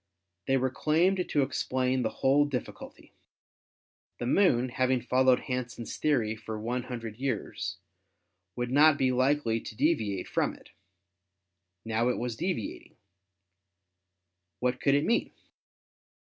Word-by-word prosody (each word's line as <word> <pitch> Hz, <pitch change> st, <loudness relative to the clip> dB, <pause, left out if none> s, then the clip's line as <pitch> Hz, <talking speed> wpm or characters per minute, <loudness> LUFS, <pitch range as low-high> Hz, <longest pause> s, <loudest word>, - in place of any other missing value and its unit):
They 135 Hz, -, +3 dB
were 130 Hz, 0 st, 0 dB
claimed 175 Hz, +7 st, +1 dB
to 145 Hz, -, +2 dB
explain 130 Hz, -1 st, 0 dB
the 110 Hz, -, 0 dB, 0.2 s
whole 140 Hz, +2 st, +5 dB
difficulty. 135 Hz, -4 st, -7 dB, 1.0 s
The 120 Hz, -, -4 dB
Moon, 130 Hz, -5 st, +3 dB
having 130 Hz, 0 st, +1 dB
followed 130 Hz, +1 st, +3 dB
Hansen's 125 Hz, -2 st, -4 dB
theory 120 Hz, -8 st, +1 dB
for 110 Hz, 0 st, -6 dB
one 120 Hz, +3 st, -2 dB
hundred 115 Hz, -4 st, -6 dB
years, 130 Hz, -5 st, -3 dB, 0.8 s
would 120 Hz, 0 st, -3 dB
not 150 Hz, +2 st, +6 dB
be 130 Hz, -2 st, +2 dB
likely 130 Hz, -2 st, +1 dB
to -, -, -9 dB
de 165 Hz, +2 st, +4 dB
viate 100 Hz, -7 st, -4 dB
from -, -, 0 dB
it. -, -, -18 dB, 1.1 s
Now 115 Hz, +2 st, +1 dB
it 125 Hz, -, 0 dB
was 120 Hz, -1 st, -3 dB
deviating. 170 Hz, -, -4 dB, 1.6 s
What 125 Hz, 0 st, -1 dB
could 140 Hz, -, +3 dB
it 145 Hz, -, +2 dB
mean? 235 Hz, -, 0 dB
125 Hz, 130 wpm, -29 LUFS, 120-140 Hz, 1.6 s, not